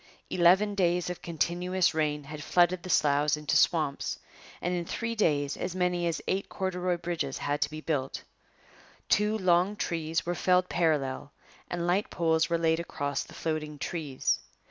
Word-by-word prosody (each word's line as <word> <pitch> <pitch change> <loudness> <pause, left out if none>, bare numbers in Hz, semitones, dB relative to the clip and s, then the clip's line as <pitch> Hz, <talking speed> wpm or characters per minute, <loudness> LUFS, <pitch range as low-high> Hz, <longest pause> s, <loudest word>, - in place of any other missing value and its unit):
Eleven 185 +4 +4
days 180 -2 +1
of 180 - -7
continuous 175 +2 0
rain 150 -2 0
had 150 +1 -8
flooded 175 +2 +3
the 185 - -8
sloughs 150 -2 +3
into 150 -1 -1
swamps; 155 -5 +2 0.4
and 180 - -1
in 175 -1 -1
three 230 +6 -3
days 145 -10 +1
as 180 - -4
many 180 -1 +1
as 165 - -1
eight 195 +1 -1
corduroy 180 -2 -1
bridges 165 -5 -3
had 145 +1 -2
to 150 - +2
be 155 +1 -7
built. 140 -5 -2 0.9
Two 210 +1 +3
long 185 +1 +3
trees 165 -4 -2
were 175 - 0
felled 180 0 +2
parallel 145 -5 0 0.4
and 175 -1 -2
light 185 +4 +1
poles 160 -2 +1
were 170 - +2
laid 165 0 +2
across 145 -4 -3
the - - -14
floating 155 -2 -3
trees. 145 -4 -1
170 Hz, 165 wpm, -29 LUFS, 150-180 Hz, 0.9 s, Eleven